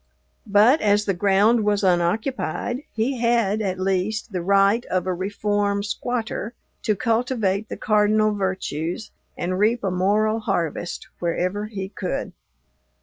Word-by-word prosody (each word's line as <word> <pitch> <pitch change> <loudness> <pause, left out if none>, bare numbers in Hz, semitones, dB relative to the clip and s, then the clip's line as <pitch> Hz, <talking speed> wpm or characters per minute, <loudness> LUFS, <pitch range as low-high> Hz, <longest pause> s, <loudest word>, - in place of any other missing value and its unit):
But, 215 +9 +5
as 205 0 +3
the 195 - +1
ground 205 +5 +3
was 205 -1 +1
unoccupied, 190 - 0
he 240 +3 -1
had, 230 -3 +2
at 185 -3 -2
least, 195 +4 -1
the 180 -3 -2
right 200 +5 +3
of 185 -1 -1
a 185 - 0
reform 200 +2 -1
"squatter" 230 +1 -3 0.3
to 215 - +1
cultivate 225 -3 0
the - - -5
cardinal 215 0 +2
virtues 190 -1 -3 0.3
and 185 +2 -2
reap 225 +3 +2
a 195 - 0
moral 210 +4 +1
harvest 175 - -2
wherever 180 +4 -1
he 195 -3 -5
could. 190 -2 -4
205 Hz, 135 wpm, -23 LUFS, 190-220 Hz, 0.3 s, But